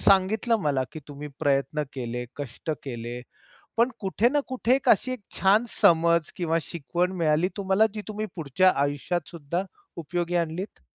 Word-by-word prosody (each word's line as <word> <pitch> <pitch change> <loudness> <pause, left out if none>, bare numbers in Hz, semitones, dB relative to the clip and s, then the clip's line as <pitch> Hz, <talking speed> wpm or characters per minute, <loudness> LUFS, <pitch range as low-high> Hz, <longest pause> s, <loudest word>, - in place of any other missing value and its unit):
सांगितलं 215 +5 +4
मला, 135 -3 +2
की 155 - -7
तुम्ही 145 +1 -7
प्रयत्न 145 +1 +1
केले, 125 -2 -4
कष्ट 145 +2 -5
केले, 120 -2 -5 0.6
पण 235 +2 +4
कुठे 200 +4 +2
ना 290 +3 +2
कुठे 255 -1 +2
एक 270 - -3
अशी 255 +5 +4
एक 255 - -5 0.2
छान 200 +4 +4 0.2
समज 170 -3 +4
किंवा 165 -2 +1
शिकवण 175 +4 -2
मिळाली 155 +3 +3
तुम्हाला 200 +2 +3
जी 210 - -4
तुम्ही 215 0 -3
पुढच्या 175 +5 +3
आयुष्यातसुद्धा 165 +3 -2 0.3
उपयोगी 175 +1 -2
आणलीत? 170 +4 -2
170 Hz, 150 wpm, -26 LUFS, 145-200 Hz, 0.6 s, सांगितलं